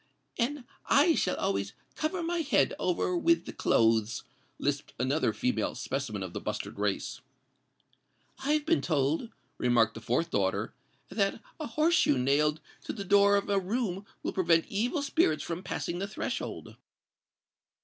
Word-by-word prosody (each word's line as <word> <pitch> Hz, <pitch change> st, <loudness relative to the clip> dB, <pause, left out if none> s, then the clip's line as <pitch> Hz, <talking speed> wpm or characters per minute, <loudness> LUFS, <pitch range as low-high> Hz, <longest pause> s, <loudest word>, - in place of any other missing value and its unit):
"And 265 Hz, +3 st, 0 dB, 0.2 s
I 315 Hz, +4 st, +5 dB
shall 185 Hz, -, +1 dB
always 100 Hz, +1 st, -1 dB, 0.2 s
cover 335 Hz, +3 st, -2 dB
my 340 Hz, +1 st, -1 dB
head 310 Hz, -3 st, +2 dB
over 365 Hz, -, 0 dB
with 335 Hz, 0 st, +3 dB
the -, -, -7 dB
clothes," 115 Hz, 0 st, +2 dB, 0.3 s
lisped 145 Hz, 0 st, -2 dB
another 135 Hz, +6 st, +1 dB
female 255 Hz, 0 st, -1 dB
specimen -, -, -3 dB
of -, -, -7 dB
the -, -, -4 dB
Bustard -, -, -4 dB
race. -, -, -2 dB, 1.2 s
"I've 295 Hz, +2 st, +1 dB
been 335 Hz, +1 st, +3 dB
told," 155 Hz, -, 0 dB, 0.3 s
remarked 115 Hz, -2 st, +3 dB
the 115 Hz, -, -9 dB
fourth 125 Hz, +10 st, 0 dB
daughter, 95 Hz, -2 st, 0 dB, 0.4 s
"that 195 Hz, +1 st, 0 dB, 0.2 s
a 310 Hz, -, -3 dB
horse 310 Hz, +8 st, +2 dB
shoe 310 Hz, -, +4 dB
nailed 150 Hz, +4 st, +2 dB, 0.2 s
to -, -, -3 dB
the 200 Hz, -3 st, -6 dB
door 200 Hz, +1 st, +5 dB
of 200 Hz, -, 0 dB
a 200 Hz, -1 st, +2 dB
room 200 Hz, -1 st, -2 dB, 0.2 s
will -, -, -2 dB
prevent 165 Hz, -3 st, +3 dB
evil 245 Hz, -, 0 dB
spirits 275 Hz, -, +2 dB
from 170 Hz, +1 st, -4 dB
passing 175 Hz, -2 st, -3 dB
the 195 Hz, -, -2 dB
threshold." 205 Hz, -, -5 dB
195 Hz, 150 wpm, -30 LUFS, -, 1.2 s, I